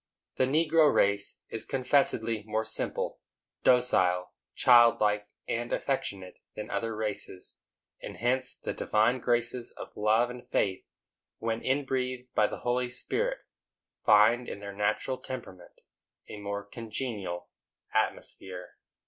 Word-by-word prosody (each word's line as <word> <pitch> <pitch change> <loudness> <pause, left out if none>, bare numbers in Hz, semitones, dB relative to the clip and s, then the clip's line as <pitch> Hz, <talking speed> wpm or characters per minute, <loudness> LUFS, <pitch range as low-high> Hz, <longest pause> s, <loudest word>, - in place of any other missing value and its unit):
The 130 - +4
negro 155 +1 +4
race 100 0 +2
is 115 -1 -2
confessedly 125 -4 +1
more 110 +1 -2
simple, 110 - -2 0.4
docile, 95 -8 +3 0.2
childlike 115 -4 +5 0.2
and 120 +1 -2
affectionate, 100 -9 -2 0.2
than 105 - -6
other 115 -1 -2
races; 105 -4 -4 0.4
and - - -7
hence 130 +2 +1
the - - -5
divine 110 +4 +2
graces 120 0 0
of - - -10
love 110 +3 +2
and 125 0 -11
faith, 95 -2 0 0.5
when 115 0 -2
in 135 +2 0
breathed 130 -1 -3
by 105 - +4
the - - -7
Holy 125 0 0
Spirit, - - -2 0.6
find 110 +4 +5
in - - -5
their 100 0 -7
natural 105 +5 -1
temperament 95 -9 -9 0.5
a - - -8
more 100 0 -4
congenial 105 -4 -5 0.4
atmosphere. 90 -2 -3
115 Hz, 125 wpm, -29 LUFS, 105-125 Hz, 0.6 s, childlike